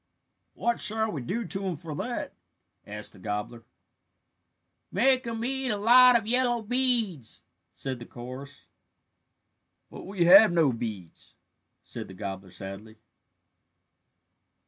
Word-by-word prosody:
"What 235 0 -1
shall 220 0 0
we 145 - -5
do 220 - -3
to 195 - -3
him 185 -3 -2
for 155 0 -8
that?" - - -4 0.5
asked 105 +1 -6
the - - -16
gobbler. 105 +4 -5 1.3
"Make 255 +5 +2
him 230 0 -3
eat 265 0 -1
a 210 - 0
lot 245 +3 +7
of 225 - -5
yellow 240 0 +1
beads," 230 - 0 0.3
said 130 -2 -6
the 120 - -10
chorus. 130 +3 -10 1.2
"But - - -10
we 190 -3 0
have 195 +4 +8
no 160 -6 +3
beads," 105 -7 -8 0.5
said - - -8
the 95 - -12
gobbler 95 -1 -7
sadly. 100 +4 -9
175 Hz, 125 wpm, -27 LUFS, -, 1.3 s, have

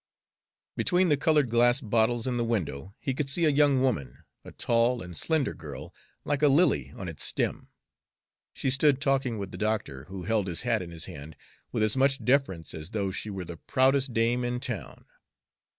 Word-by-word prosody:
Between 180 0 +2
the 150 - +5
colored 150 -4 +2
glass 120 +2 +4
bottles 115 -1 +1
in 125 -2 -1
the 120 - +1
window 100 -5 -3
he 135 - -2
could 135 +1 -3
see 165 +4 +2
a - - +5
young 140 -2 +3
woman, 70 - -2 0.2
a - - -10
tall 120 +1 +1
and 90 -1 -9
slender 155 - 0
girl, 75 -3 -9 0.3
like 145 0 -1
a 150 - +6
lily 135 - +3
on 95 - -6
its 80 -3 -5
stem. - - -1 0.8
She 130 - -2
stood 135 0 +3
talking 135 -4 0
with 100 -2 -5
the 90 - -8
doctor, 105 -11 -2
who 95 +1 -8
held 105 0 0
his 85 -2 -2
hat 115 -3 +1
in 90 - -7
his 85 -2 -4
hand 75 +2 -9 0.4
with 110 - 0
as 110 -1 +2
much 135 +1 +2
deference 125 - +1
as 80 +1 -7
though 100 -3 -2
she 105 +2 -4
were 95 -3 -5
the 85 0 -8
proudest 130 - +2
dame 115 +2 +1
in 120 0 -2
town. 120 - -6
115 Hz, 195 wpm, -28 LUFS, 95-135 Hz, 0.8 s, a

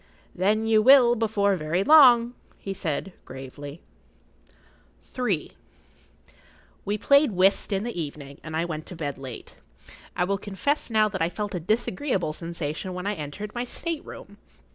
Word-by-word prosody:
"Then 210 +4 +1
you 220 -1 +4
will 250 0 +7
before 210 -3 +1
long," 235 - +5 0.2
he 195 - -5
said, 165 0 -3
very - - -30
gravely. 140 +4 -9 0.7
[Pg - - -18 0.5
36] - - -14 0.3
III. - - -30 1.3
We 205 +1 -1
played 280 +4 +4
whist 190 +3 +2
in 195 0 0
the 230 -7 -4
evening, 140 -2 -8
and 160 0 -5
I 165 - 0
went 155 -2 -6
to 180 - -9
bed 145 -4 -5
late. 130 -3 -9 0.6
I - - +1
will 195 +2 -1
confess 205 +11 -2
now 215 -1 +3
that 200 -4 -5
I 165 - +2
felt 205 +4 -5
a 180 - -2
disagreeable 195 - -1
sensation 170 +1 -5
when 180 0 -5
I 205 - 0
entered 185 +5 -7
my 240 - -2
state 325 +5 -4
room. - - -11
195 Hz, 165 wpm, -25 LUFS, 160-225 Hz, 1.3 s, will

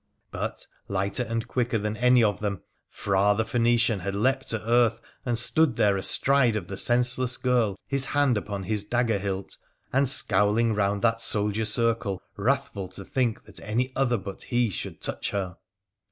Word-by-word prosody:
But, - - -5 0.2
lighter 100 +4 -2
and 115 0 -3
quicker 120 -2 -1
than 105 0 -3
any 125 +1 +4
of 105 -3 +1
them, 100 -3 -3 0.3
Ph: 100 +1 +1
the 110 - 0
Phoenician 115 -2 +2
had 100 +2 -4
leapt 130 +5 0
to 110 -1 -3
earth, 115 -1 +3 0.3
and 120 -1 0
stood 135 +3 +2
there 100 -2 +3
astride 125 +4 +3
the 95 - -6
senseless 125 +2 +1
girl, 120 -6 +1
his 135 -1 +1
hand 145 -4 +2
upon 100 -1 -4
his 105 +1 -1
dagger 115 -1 0
hilt, 95 -1 -4 0.4
and 135 +1 +3
scowlii 110 -1 +2
round 100 0 0
that 115 -1 +2
soldier 105 0 +2
circle 110 -3 +1 0.2
wrathful 110 -3 -1
to 95 +1 -11
think 120 -2 -1
that - - -12
any 125 +4 -2
other 125 -3 +1
b 100 0 -6 0.2
he 120 -3 +1
should - - -6
touch - - -3
her 95 -3 -4
115 Hz, 170 wpm, -26 LUFS, 100-125 Hz, 0.4 s, any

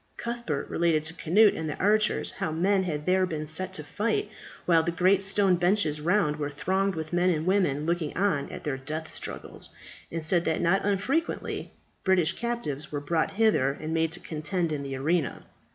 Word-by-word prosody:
Cuthbert 235 -12 -3
related 165 -2 +1
to 160 +1 -1
Cnut 195 +6 +4
and 160 -1 -3
the - - -4
archers, 215 +2 +2
how 190 -6 -3
men 190 +5 +2
had 150 -5 -3
there 185 0 +3
been 155 -3 -4
set 180 +5 -2
to 150 - -4
fight, 220 - -1 0.3
while 165 -2 +5
the 170 - -1
great 185 +3 +3
stone 195 -2 +3
benches 175 -4 +1
round 165 -3 +2
were 145 -1 -2
thronged 190 +6 0
with 160 0 -5
men 175 +1 +3
and 160 -2 0
women 180 -7 +1
looking 170 -2 -1
on 180 -8 +1
at - - -8
their 145 -3 -2
death 155 +4 -5
struggles, - - -5 0.4
and 165 -1 -2
said 170 +1 +4
that 160 - +1
not 175 +3 +2
unfrequently 205 - -1 0.3
British 185 -3 +3
captives 235 - -3
were 145 - -2
brought 160 +3 0
hither 200 -11 +3
and 155 +1 -4
made 165 -1 +1
to 175 - 0
contend 160 +2 -2
in 150 -2 -2
the 135 -1 -4
arena. 155 +3 -1
170 Hz, 190 wpm, -27 LUFS, 155-195 Hz, 0.4 s, while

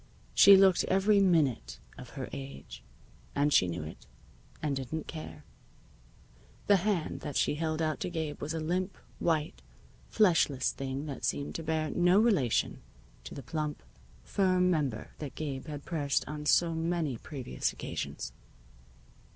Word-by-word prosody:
She 200 -1 +9
looked 190 -2 +5
every 200 +2 +3
minute 140 - +2 0.2
of - - -10
her - - -4
age, 70 +1 -8 0.5
and 145 +1 +2
she 90 - +5
knew 85 -2 -4
it, 75 -5 -10 0.5
and 150 -2 -1
didn't 135 +4 -4
care. 155 -1 -8 1.2
The 200 - +5
hand 185 -3 -1
that 145 - -6
she - - +2
held 160 +1 -1
out 155 -2 -1
to - - -2
Gabe 160 -4 -4
was 155 +3 -3
a - - -2
limp, 180 +4 -2 0.2
white, 155 - 0 0.5
fleshless 165 -10 +3
thing 135 +1 -4
that 140 -3 -6
seemed 145 - -1
to 165 - -5
bear 155 -1 -1
no 175 +2 +4
relation 195 - +2 0.4
to - - -8
the 140 - -7
plump, 150 +4 -4 0.4
firm 185 -2 +2
member 140 -9 -1
that 145 -3 -6
Gabe 140 -3 -5
had 145 -2 -7
pressed 145 -5 -1
on 150 0 -5
so 165 +3 +4
many 160 -6 -1
previous 130 - -3
occasions. - - -5
155 Hz, 150 wpm, -30 LUFS, 140-175 Hz, 1.2 s, She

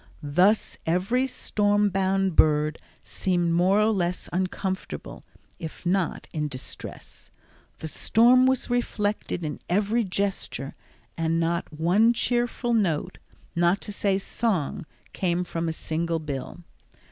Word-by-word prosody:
Thus 195 +6 +3
every 195 +11 +1
storm 205 -4 +1
bound 195 -1 +1
bird 150 0 +3 0.2
seemed 175 -3 0
more 185 +4 +4
or 215 +1 +4
less 180 -3 -1
uncomfortable, 190 +1 -3 0.4
if 160 +2 -8
not 180 -1 0
in 150 -1 -1
distress. 130 -3 -8 0.5
The 160 - -6
storm 245 +9 +4
was 260 -1 +1
reflected 210 -7 -1
in 150 - -4
every 210 +6 +2
gesture, 195 -7 -2 0.4
and 165 0 0
not 170 0 -1
one 180 +9 +3
cheerful 240 0 0
note, 180 -10 0 0.4
not 175 +3 +3
to 210 - -5
say 195 -1 +1
song, 195 -7 -1 0.3
came 180 -1 0
from 170 -1 -3
a - - 0
single 165 +1 -2
bill. 150 +2 -6
185 Hz, 125 wpm, -26 LUFS, 165-210 Hz, 0.5 s, more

